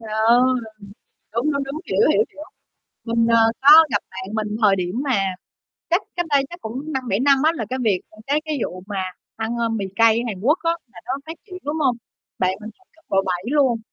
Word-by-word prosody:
Trời 225 - -10
ơi! 230 +2 +4 0.9
Đúng, 260 +6 +1
đúng, 280 0 -1
đúng, 280 +3 -6
hiểu, 460 - +3
hiểu, 440 - +3
hiểu. 300 - -10 0.6
Mình, 230 0 +1
ờ, 230 0 +4 0.2
có 305 +4 +9
gặp - - +1
bạn 190 +2 -7
mình 215 -1 -2
thời 200 -2 +5
điểm 180 +6 -2
mà 195 -9 0 0.6
chắc 345 +4 +3
cách 350 -1 -1
đây 280 -2 +3
chắc 345 +1 -10
cũng 265 +8 -6
5-7 250 -7 -1
năm 275 +2 +4
á 315 - +5
là 230 - -3
cái 260 - -2
việc, 200 -5 +2
à, 215 - -19
cái 295 +2 +1
cái 310 -2 -2
vụ 180 0 -6
mà 195 -2 -2 0.3
ăn, 225 +1 -3
ơ, 230 -1 0
mì 220 -3 -2
cay 225 +1 +5
Hàn 200 -5 -5
Quốc 295 - +3
á 330 - +3 0.2
là 175 - -12
nó 255 - -2
phát 320 - -6
triển, 365 -3 -9
đúng 295 +2 -3
hông? 265 -5 +2 0.4
Bạn 185 0 +2
mình 215 - -7
ăn 375 - -30
cấp 320 - -27
độ 195 - +1
7 180 -1 -2
luôn, 270 -6 +3
235 Hz, 230 wpm, -21 LUFS, 215-290 Hz, 0.9 s, có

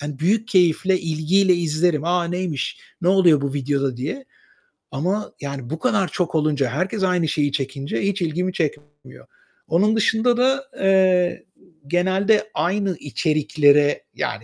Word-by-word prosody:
hani 145 -1 -6
büyük 210 +9 0
keyifle, 185 -1 +2
ilgiyle 170 +4 +2
izlerim. 165 -2 0
"A! 175 0 +1
Neymiş, 175 -4 -3 0.2
ne 175 - +2
oluyor 180 -6 +4
bu 140 -1 -3
videoda?" 140 -2 -1
diye 155 - -5 0.7
ama 185 +9 -2
yani 140 -4 -6
bu 160 +2 -4
kadar 205 -5 +1
çok 170 +1 -3
olunca, 150 -4 +1
herkes 185 - -2
aynı 180 -3 +1
şeyi 145 -1 0
çekince 135 0 -3
hiç 195 0 -1
ilgimi 175 +3 -1
çekmiyor. 145 -4 -6 0.4
Onun 200 +7 +2
dışında 225 +2 +2
da, 265 +2 +1
eee, 185 -2 +2 0.4
genelde 190 +6 +1
aynı 195 -1 -1
içeriklere 145 -1 +2
yani - - -3
175 Hz, 135 wpm, -21 LUFS, 145-190 Hz, 0.7 s, oluyor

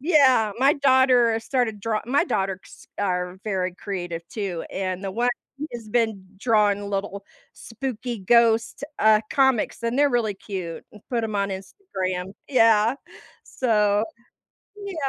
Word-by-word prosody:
Yeah, 260 - +4
my 275 +3 +4
daughter 260 -4 +4
started 230 -3 -1
draw 215 +1 -1
my 280 +7 +2
daughters 195 - -4
are 180 -2 -1
very 185 -4 -1
creative 175 -4 -5
too, 195 -6 -4
and 185 -1 -3
the 195 - -3
one 240 +4 +1 0.4
has 230 -2 -8
been 220 -4 0
drawing 205 -2 +2
little 200 0 -3 0.3
spooky 240 0 -5
ghost, 230 +4 +3
uh, 215 0 +5
comics, 265 -5 +2
and 235 +3 -1
they're 290 0 +4
really 230 -4 0
cute 185 -4 -6
and 210 - -14
put 235 -2 0
'em 215 -1 -4
on 200 0 0
Instagram 190 - -5 0.2
yeah, 225 -3 +4 0.5
so, 210 -4 +1 0.8
yeah. 395 -3 -6
215 Hz, 135 wpm, -24 LUFS, 195-245 Hz, 0.8 s, uh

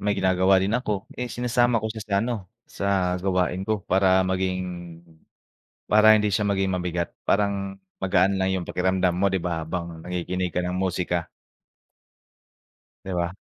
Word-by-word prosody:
may 105 - +1
ginagawa 95 0 +3
din 100 +5 +1
ako, 105 -5 -3
eh, 125 - -2
sinasama 120 -1 +1
ko 110 - -2
siya 110 -1 -6
sa 100 -2 -2
ano, 120 +2 -1 0.3
sa 95 -2 0
gawain 90 0 0
ko 110 0 -1
para 95 -1 +3
maging 95 0 0 1.3
para 110 +1 +7
hindi 105 -1 +1
siya 105 +1 +1
maging 95 -1 +1
mabigat. 90 -2 -2 0.2
Parang 100 -1 +1 0.2
magaan 95 0 +2
lang 95 0 +1
yung 90 - -2
pakiramdam 95 0 +1
mo, 100 - +3
di 95 - 0
ba, 80 -2 -2
habang 85 -1 -5
nakikinig 90 +1 -3
ka 90 - +1
ng 90 +1 -2
musika. 90 -2 -1 1.8
Di 95 - -5
ba? 90 +1 -2
95 Hz, 155 wpm, -25 LUFS, 90-100 Hz, 1.8 s, para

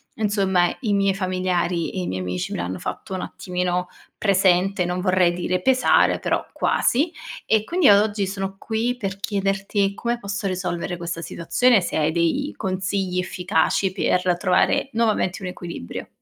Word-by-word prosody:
insomma, 195 -5 +1
i 210 -4 0
miei 195 -1 +2
familiari 185 -2 -1
e 185 - -3
i - - -3
miei 95 0 -3
amici 90 0 -3
me - - -3
l'hanno 90 +1 -3
fatto 190 - -5
un 185 - -3
attimino 180 -1 -2 0.3
presente 190 -1 +2
non 180 +1 -2
vorrei 185 -2 +3
dire 180 +1 -1
pesare, 255 +4 +3
però - - -1
quasi. 295 +7 +1 0.3
E 220 -1 +2
quindi 350 -2 +2
io 200 -1 +8
oggi 210 -2 -1
sono 195 0 -4
qui 230 +4 -1
per 195 -4 -4
chiederti 195 0 0
come 235 0 -1
posso 200 -1 -3
risolvere 180 -1 -3
questa 170 0 -4
situazione, 180 +8 +2
se - - -2
hai 155 0 +2
dei 175 - 0
consigli 190 -1 -2
efficaci 180 +1 0
per 180 -1 +1
trovare 185 +8 +2
nuovamente 215 -5 0
un 180 - -3
equilibrio. 170 - -7
185 Hz, 160 wpm, -23 LUFS, 180-205 Hz, 0.3 s, io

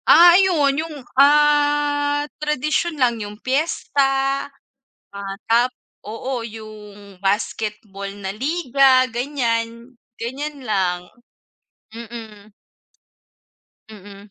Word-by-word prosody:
Ah, 345 +1 +8
ayun 345 -7 +4
'yung, 320 -1 -7 0.2
ah, 290 0 +3 0.2
tradisyon 305 +2 -1
lang. 240 -4 +1
'Yung 205 0 -7
piyesta, 275 0 0 0.6
ah, 200 -1 -6
tap 240 +2 +3 0.3
oo, 240 +4 -4
'yung 210 -3 -11
basketball 205 0 -2
na 190 0 -4
liga, 270 - +3
ganiyan. 235 -2 -2 0.3
Ganiyan 285 +5 -4
lang, 185 -5 0 0.9
mm. 220 -2 -10 1.4
Mm. 205 -1 -13
245 Hz, 85 wpm, -21 LUFS, 210-290 Hz, 1.4 s, Ah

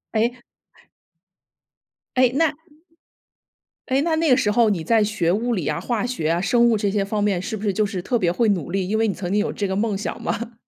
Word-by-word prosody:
诶。 240 +3 0 1.8
诶， 255 -1 +4
那， 320 0 +2 1.3
诶， 265 0 +1
那 325 +1 +1
那 320 0 +1
个 250 - +5
时 210 - +1
候 225 +1 +3
你 190 -5 -1
在 225 +4 +3
学 210 -5 -1
物 235 +6 0
理 180 -9 -2
啊、 150 - -1
化 235 -2 -2
学 245 -11 -2
啊、 170 +1 +1
生 235 +5 +3
物 225 - +2
这 205 -1 0
些 200 0 0
方 205 +1 -2
面 200 -4 +1
是 220 +4 -4
不 205 - -9
是 205 -2 0
就 215 +2 +1
是 195 -3 -4
特 240 +7 0
别 180 -6 +1
会 225 +6 +1
努 175 -5 -1
力， 190 -1 -1
因 215 +3 0
为 225 0 +2
你 - - -1
曾 180 -2 -5
经 210 - +2
有 220 - -2
这 200 - -2
个 190 - -2
梦 205 0 0
想 210 - -5
嘛。 235 +1 -3
215 Hz, 255 characters per minute, -22 LUFS, 195-235 Hz, 1.8 s, 个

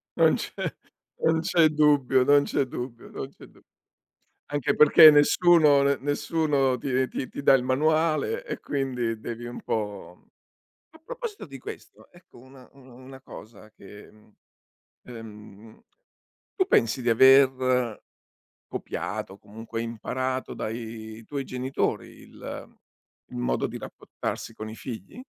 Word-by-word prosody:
Non - - +4
c'è - - -6 0.7
non 160 0 +3
c'è 165 -1 +3
dubbio, 145 -4 +3
non 145 +1 +5
c'è 135 - -1
dubbio, 125 -1 -8
non 135 - -7
c'è - - -15
du - - -22 0.9
anche 145 -3 0
perché 150 +1 +9
nessuno 150 -1 +5
ne 140 0 +2
nessuno 145 -2 0
ti 130 +1 -1
ti 130 - -4
ti 140 - -7
dà - - +6
il 130 - +3
manuale, 155 - +1
e - - -5
quindi 125 -5 -3
devi 120 +2 -7
un 120 - -8
po' 105 -5 -4
mhmm, - - -31 0.6
a 320 - -18
proposito 480 -4 -7
di 135 -3 -10
questo, - - -11
ecco - - -19
una 130 0 -16
una 130 -2 -17
una 130 +1 -13
cosa 110 -2 -13
che 105 0 -14
mhmm, 110 0 -23 0.7
uhm, 110 -2 -12 0.7
tu 375 -3 +2
pensi 115 - +2
di 120 - +1
aver 130 -1 +4 0.6
copiato, 105 -1 -5
o 100 - -17
comunque 115 +2 -7
imparato 130 +3 -4
dai 110 0 -7
tuoi 140 +2 -5
genitori 130 +2 -2
il - - -10 0.5
il - - -9
modo - - -1
di - - -7
rapportarsi 115 - -7
con 110 0 -7
i 110 - -8
figli? 125 - -9
130 Hz, 140 wpm, -26 LUFS, 115-145 Hz, 0.9 s, perché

